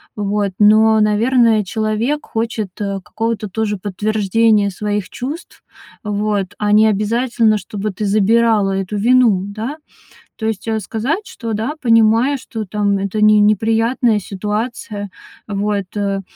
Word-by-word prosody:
Вот. 205 -1 -1
Но, 215 +1 +5
наверное, 220 +1 +3
человек 220 +8 -2
хочет, 225 -2 -3
э, 200 -1 -2
какого-то 225 -1 -3
тоже 210 +1 -2
подтверждения 210 +1 +1
своих 205 0 -3
чувств. 290 +7 -7 0.4
Вот. 205 -2 -2
А 210 -1 0
не 215 +1 +5
обязательно, 220 +1 +1
чтобы 205 +1 -5
ты 210 +2 -4
забирала 215 0 +2
эту 190 +3 -6
вину, 230 -3 +3
да? 220 +8 -5 0.6
То 220 - -5
есть, 220 -1 -3
э, 220 -1 0
сказать, 270 - -3
что, 235 -12 -6
да, 220 +7 -2
понимаю, 230 +3 +3
что, 225 -4 -6
там, 205 0 0
это 200 +2 -2
не 215 0 +6
неприятная 225 +2 +2
ситуация. 210 +1 -4 0.4
Вот, 205 -1 -2
э. 200 -1 -1
215 Hz, 130 wpm, -17 LUFS, 205-225 Hz, 0.6 s, не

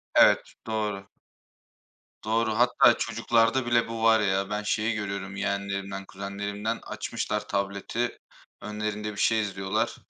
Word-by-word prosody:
Evet, - - +5
doğru. 105 -3 -2 1.2
Doğru. 110 0 +1
Hatta 120 -1 +5
çocuklarda 115 +2 +2
bile 120 -1 +2
bu 115 0 -4
var 115 -1 +6
ya, 95 -1 +1
ben 105 0 -2
şeyi 110 +2 0
görüyorum 100 -1 -4
yeğenlerimden, 100 -1 -3
kuzenlerimden 100 +3 -4
açmışlar 105 0 -3
tableti. 100 +5 -2 0.4
Önlerinde 105 0 -3
bir 105 - -11
şey 110 -1 +3
izliyorlar, 95 -2 -1
105 Hz, 120 wpm, -27 LUFS, 100-115 Hz, 1.2 s, var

